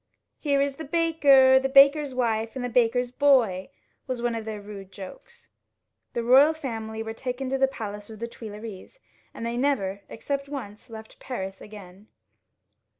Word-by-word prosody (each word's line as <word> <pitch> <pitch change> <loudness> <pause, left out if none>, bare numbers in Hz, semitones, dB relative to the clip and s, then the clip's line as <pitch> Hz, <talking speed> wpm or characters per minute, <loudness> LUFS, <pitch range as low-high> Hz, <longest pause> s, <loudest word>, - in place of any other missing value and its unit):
"Here 285 -2 +1
is 280 -1 -1
the 320 - -6
baker, 280 -5 +5
the 270 0 -1
baker's 280 0 +5
wife, 225 -2 -1
and 255 -2 -3
the - - -3
baker's 245 +1 +2
boy," 250 -8 +3 0.4
was 255 -2 -3
one 240 0 -1
of 225 -1 -5
their 215 -1 -5
rude 200 -2 -10
jokes. 200 - -12 0.7
The 235 - -2
royal 275 +6 +6
family 225 -6 -5
was 225 0 -7
taken 255 +1 -4
to 270 - 0
the 270 - +4
palace 210 -5 -7
of 220 - -9
the 235 +2 -4
Tuileries, 220 - -10 0.3
and 230 - -7
they 235 +1 -2
never, 200 -8 0
except 275 +4 -4
once, 235 -6 -8
left 220 -1 -11
Paris 195 -6 -6
again. 205 -1 -12
240 Hz, 165 wpm, -26 LUFS, 215-275 Hz, 0.7 s, royal